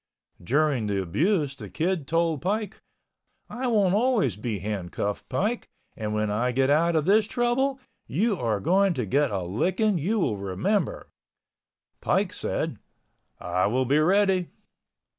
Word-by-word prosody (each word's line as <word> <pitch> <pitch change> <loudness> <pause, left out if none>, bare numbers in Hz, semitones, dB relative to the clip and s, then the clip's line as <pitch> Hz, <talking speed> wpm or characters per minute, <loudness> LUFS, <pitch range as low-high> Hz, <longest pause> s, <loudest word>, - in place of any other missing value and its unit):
During 135 - +1
the 100 -1 0
abuse 145 - 0
the 105 -7 -9
Kid 160 - -1
told 165 -2 +1
Pike, 210 +2 -2 0.7
"I 255 +1 -4
won't 205 -6 +3
always 215 - +2
be 105 +1 -3
handcuffed, 100 0 -4
Pike, 225 +5 -1 0.3
and 105 -1 -4
when 105 -1 0
I 120 +4 0
get 135 +2 +2
out 165 +3 +3
of 155 -2 +1
this 210 +3 +4
trouble, 255 +3 0 0.3
you 205 - +1
are 115 -6 -1
going 190 - +2
to 125 - -2
get 140 +7 +2
a 100 -4 -2
licking 185 - 0
you 200 +10 0
will 110 - 0
remember." 100 - -2 0.9
Pike - - 0
said, - - -3 0.6
"I 90 +1 0
will 130 +5 +1
be 140 +4 +3
ready." 190 +2 +3
155 Hz, 145 wpm, -26 LUFS, -, 0.9 s, this